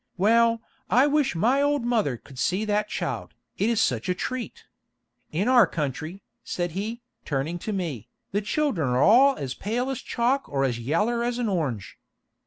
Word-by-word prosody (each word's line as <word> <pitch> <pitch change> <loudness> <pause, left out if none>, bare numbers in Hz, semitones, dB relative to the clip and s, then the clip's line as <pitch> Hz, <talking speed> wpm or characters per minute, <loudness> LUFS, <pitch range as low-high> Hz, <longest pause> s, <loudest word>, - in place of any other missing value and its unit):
Well, 230 +3 +3 0.3
I 255 +3 +5
wish 290 - +1
my 245 +11 +3
old 285 -3 +1
mother 215 - +1
could 130 +2 -13
see 190 +9 0
that 210 0 0
child, - - -4 0.2
it 205 - +2
is 230 -2 +1
such 125 - 0
a 180 - +1
treat. 255 +5 -5 0.7
In 185 +8 0
our 250 -3 +6
country," 155 +5 -4 0.2
said 175 -1 -3
he, 220 +7 -4 0.2
turning 150 +4 -2
to 215 - -4
me, 155 - -4 0.2
"the 205 - 0
children 215 - 0
are 125 +2 +2
all 265 +6 +6
as 130 -2 -4
pale 245 - -2
as 265 - -4
chalk 255 +4 0
or 135 -1 0
as 125 -3 0
yaller 210 - 0
as 240 0 -1
an 240 -3 -1
orange. 140 - -3
210 Hz, 180 wpm, -25 LUFS, 155-240 Hz, 0.7 s, our